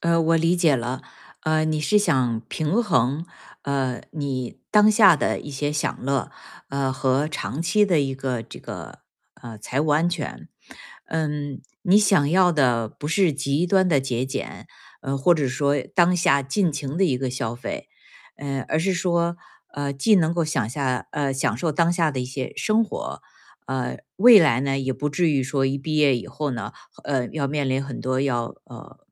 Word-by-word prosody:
呃， 170 0 +2
我 165 +1 +3
理 165 +2 +2
解 160 -6 +3
了。 125 +2 -4 0.4
呃， 155 0 +1
你 155 -1 -1
是 210 +7 +3
想 130 - +1
平 160 +8 0
衡， 150 - +1 0.4
呃， 135 -3 -1
你 135 -5 -4
当 210 0 +6
下 205 -6 +6
的 - - -1
一 145 - -9
些 145 +1 -2
享 150 -3 -3
乐， 135 -5 -1 0.4
呃， 135 -1 -1
和 135 +2 +1
长 150 -1 -4
期 210 +5 +3
的 175 -5 +2
一 135 -1 -1
个 130 -3 -3
这 - - -12
个， - - -9 0.4
呃， 115 -2 -8
财 125 +6 -2
务 155 - 0
安 155 +3 +3
全。 145 - -5 0.6
嗯， 150 -3 -3 0.2
你 195 0 +5
想 195 -8 +4
要 180 +1 +4
的 125 -7 +2
不 145 - -8
是 175 +2 +3
极 140 +4 0
端 190 0 +3
的 150 -6 +3
节 130 -2 -2
俭， 135 0 -6 0.3
嗯， 135 +1 -2
或 155 +6 +4
者 145 -4 0
说 140 +2 0 0.2
当 180 0 +4
下 140 -5 +3
尽 165 +6 0
情 145 +1 -4
的 195 - +3
一 140 -8 +1
个 130 0 -2
消 115 -3 -3
费。 120 - -6 0.5
嗯， 140 -1 -3
而 155 - -1
是 190 +2 +1
说， 170 -1 0 0.4
嗯， 140 -1 -3
既 210 +11 +4
能 170 -3 +2
够 170 -1 +1
享 140 -8 -1
下 130 -1 -2
呃， 140 -2 -1
享 130 -4 0
受 160 +4 -1
当 165 +3 +2
下 165 -3 +2
的 135 - -4
一 - - -4
些 130 0 -5
生 220 +1 +2
活， - - -6 0.5
嗯， 130 -1 -3
未 225 +2 +8
来 140 -8 +3
呢， 135 0 -1
也 135 0 -1
不 145 - -3
至 170 +2 +1
于 140 -3 +1
说 135 0 0
一 135 +1 0
毕 155 +2 -3
业 145 -3 +4
以 - - -7
后 150 0 -4
呢， 115 -5 -5 0.3
呃， 130 -4 -1
要 140 -3 -3
面 145 -1 -1
临 135 +1 0
很 135 -2 -7
多 130 0 -1
要 120 -4 0 0.2
呃， - - -13
145 Hz, 210 characters per minute, -23 LUFS, 130-165 Hz, 0.6 s, 未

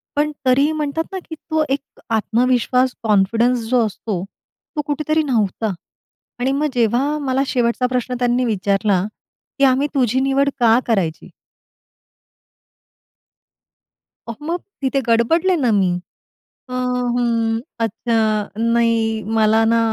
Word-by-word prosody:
पण 300 +1 +1
तरीही 275 +4 +4
म्हणतात 310 +1 -2
ना, 380 - -4
की 320 - -7
तो 315 0 -1
एक 275 +1 -4
आत्मविश्वास 250 +3 +1
कॉन्फिडन्स 225 +4 +2
जो 245 -2 +3
असतो, 205 -3 -4 0.5
तो 300 - 0
कुठेतरी 305 +2 0
नव्हता. 220 -5 0 0.7
आणि 255 +2 +1
मग 290 +2 +1
जेव्हा 250 +5 +1
मला 265 -1 0
शेवटचा 245 0 +1
प्रश्न 250 0 -2
त्यांनी 245 0 +1
विचारला, 200 -3 +1 0.6
की - - +2
"आम्ही 265 +2 +3
तुझी 255 -2 +2
निवड 275 +1 +2
का 230 0 +5
करायची?" 180 -8 -1 3.0
अहो 230 +5 -8
मग 345 +2 -1 0.2
तिथे 270 +1 +1
गडबडले 320 +11 +3
ना 245 - +3
मी, 190 -2 +2 0.8
"अ, - - -9 0.5
हं, 230 -2 0 0.2
अच्छा, 230 +1 -1 0.5
नाही, 230 -1 +1 0.2
मला 220 +1 +4
ना 230 +1 +3
245 Hz, 120 wpm, -19 LUFS, 225-275 Hz, 3.0 s, का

